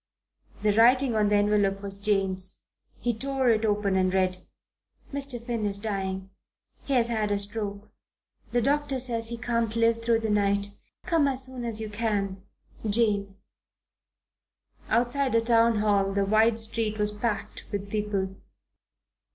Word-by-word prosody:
The 210 -1 +3
writing 250 +3 +5
on 210 -1 +2
the 210 - +3
envelope 205 -1 +1
was 195 0 +1
Jane's. 195 -2 +1 0.4
He 240 - 0
tore 265 +1 0
it 220 0 +1
open 205 -2 +1
and 185 -1 +2
read. 185 -1 0 0.7
Mr. 275 -3 0
Finn 235 -2 -4
is 200 -1 +2
dying. 195 -2 -4 0.5
He 280 - -2
has 235 -2 +3
had 215 -3 0
a 205 - +1
stroke. 205 0 -3 0.6
The 240 -1 +1
doctor 285 0 0
says 230 -3 0
he 235 - -4
can't 230 -2 -1
live 230 0 +2
through 230 -1 +2
the 220 -1 -1
night. 200 0 +1 0.3
Come 330 -5 +2
as 265 -1 -1
soon 260 -1 -7
as 225 -2 -1
you 220 - -4
can. 205 -3 -2 0.4
JANE. 205 -2 +1 1.5
Outside 245 +3 +1
the 230 - +5
Town 230 -1 +3
Hall 200 -2 +1
the 200 0 +1
wide 220 +2 +3
street 220 -1 -1
was 210 0 0
packed 210 -1 -4
with 200 -1 -4
people. 200 -3 -2
215 Hz, 150 wpm, -27 LUFS, 200-235 Hz, 1.5 s, writing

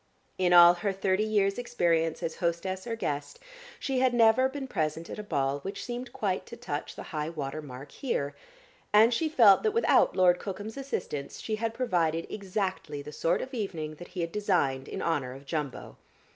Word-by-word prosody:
In 180 -1 +2
all 175 0 +9
her 200 +3 -2
thirty 190 0 0
years' 205 -1 +1
experience, 170 -9 0
as 165 -1 -3
hostess 185 +4 -2
or 230 - -2
guest, 145 -9 -4 0.4
she 265 -2 -1
had 255 -1 +3
never 230 +3 +5
been 270 0 -5
present 165 - -2
at - - -6
a - - -4
ball 140 -7 -1
which 195 +6 -6
seemed 245 +1 -5
quite 190 -3 -2
to 235 - -9
touch 150 -11 -5
the - - -7
high 150 0 -2
water 155 -2 -4
mark 140 0 -10
here, 145 - -2 0.6
and 220 +3 +6
she 315 +7 0
felt 225 -10 +6
that 435 - +1
without 460 - +4
Lord 180 -1 +4
Cookham's 205 +2 -6
assistance 265 - -4
she 215 -1 -3
had 225 +1 -2
provided 170 -9 0
exactly 190 -7 -3
the 150 - -9
sort 165 +3 0
of 265 - -9
evening 170 -9 -3
that 175 - -10
he 180 - -5
had 165 0 -2
designed, 165 -11 0
in - - -5
honour 145 -6 -1
of 135 +1 -12
Jumbo. 150 -2 -4
185 Hz, 190 wpm, -29 LUFS, 155-225 Hz, 0.6 s, all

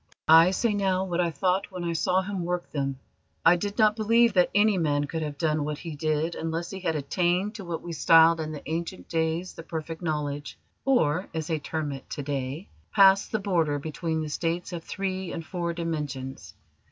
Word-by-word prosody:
"I 165 +2 +8
say 210 +4 +1
now 190 -2 +1
what 180 -1 0
I 170 - +1
thought 180 +6 0
when 180 -2 -5
I 170 -1 -1
saw 180 +3 +1
him 195 -2 -3
work 175 0 -3
them. 135 -2 -2 0.5
I 165 +2 +8
did 200 +3 -4
not 215 -2 +4
believe 230 +1 +3
that 180 -2 +4
any 210 0 +4
man 145 -3 +1
could 160 +3 -4
have 150 -2 -4
done 155 -1 +1
what 150 0 -3
he 165 -1 -7
did 155 +2 0
unless 165 +1 -3
he 195 - -6
had 165 -4 -1
attained 175 +7 0
to 210 -2 -8
what 170 -2 -4
we 175 - -5
styled 165 +1 +6
in 155 -1 -3
the 150 - -8
ancient 165 +3 -4
days 165 +2 -1
the - - -9
Perfect 160 0 -6
Knowledge, 145 -3 -3 0.3
or, 185 - +2
as 160 -1 -2
they 160 -1 -1
term 150 0 -3
it 135 -1 -8
to 145 - -4
day, 140 +5 -4 0.2
passed 195 -1 +5
the 220 - +1
border 170 -8 +1
between 160 +2 -3
the 155 - -5
states 170 +4 -2
of 170 -2 -5
three 190 -1 -3
and 165 - -5
four 170 -1 -3
dimensions. 150 -6 -5
165 Hz, 205 wpm, -27 LUFS, 155-185 Hz, 0.5 s, I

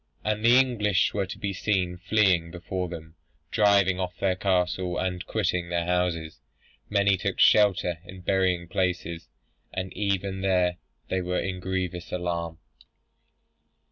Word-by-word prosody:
And 105 0 -1
the 120 +2 +6
English 105 -7 +2
were 100 -2 -1
to - - -7
be 100 -1 -3
seen 95 -2 0
fleeing 90 -3 +2
before 90 +1 -4
them, 80 -2 -9 0.4
driving 100 -3 +3
off 90 -1 -3
their 95 -2 +1
cattle, 90 -1 0
and 90 -1 -2
quitting 90 -5 -1
their 85 -1 -1
houses. 85 -5 -1 0.5
Many 100 -1 +3
took - - -3
shelter 95 -5 +4
in 90 +1 -11
burying 90 -2 +1
places, 85 -2 -2 0.4
and 95 0 -4
even 100 -1 -1
there 90 -2 +2 0.3
they 95 - 0
were 90 0 -1
in 95 -1 -3
grievous 90 -1 -3
alarm." 85 -2 -3
90 Hz, 140 wpm, -26 LUFS, 90-100 Hz, 0.5 s, the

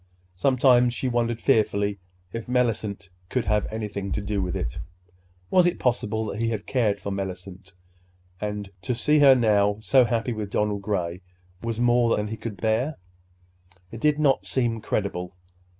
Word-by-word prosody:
Sometimes 125 +3 +4
she 130 - -2
wondered 120 -2 0
fearfully 105 -5 +1 0.3
if 115 -1 -5
Mellicent 110 -5 0 0.2
could 125 -3 -1
have 105 -1 +1
anything 105 -3 -4
to - - -1
do 100 -1 -2
with 90 -2 -2
it. - - -3 0.7
Was 180 -1 +5
it 175 - 0
possible 110 -3 0
that 105 +1 -4
he 115 - +1
had 110 -3 -3
cared 110 -6 +1
for 100 - -5
Mellicent, 95 -1 -6 0.7
and 105 -1 -4
to 125 +2 -2
see 150 +5 +3
her 140 -2 +8
now 105 -4 +3
so 130 +4 +4
happy 120 0 -1
with 105 -2 -4
Donald 105 0 0
Gray 90 -3 -2 0.4
was 115 -1 -3
more 120 -1 +3
than 105 0 -2
he 110 - -4
could 110 -2 -7
bear? 110 - 0 0.9
It 115 - -7
did 150 -1 +3
not 145 -3 +2
seem 120 -4 0
credible. 90 -4 -3
110 Hz, 165 wpm, -25 LUFS, 100-120 Hz, 0.9 s, her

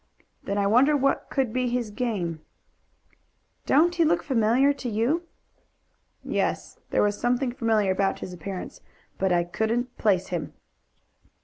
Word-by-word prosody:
"Then 200 - -3
I 200 - +1
wonder 260 +8 +4
what 275 0 0
could 260 -5 -1
be 255 0 0
his 240 -3 -2
game." 200 -9 -3 1.3
"Don't 330 +5 +4
he 345 -1 +2
look 330 +2 +2
familiar 260 +1 +3
to 265 -3 -5
you?" 235 +10 +1 1.0
"Yes; - - -2
there - - +2
was 205 0 0
something 245 +1 +1
familiar 225 -6 +1
about 195 +1 0
his 180 - -7
appearance, 180 +2 -7 0.4
but 190 -1 +1
I 175 -1 +3
couldn't 225 +7 -2
place 190 -3 +2
him." 175 -3 -4
230 Hz, 140 wpm, -25 LUFS, 200-265 Hz, 1.3 s, wonder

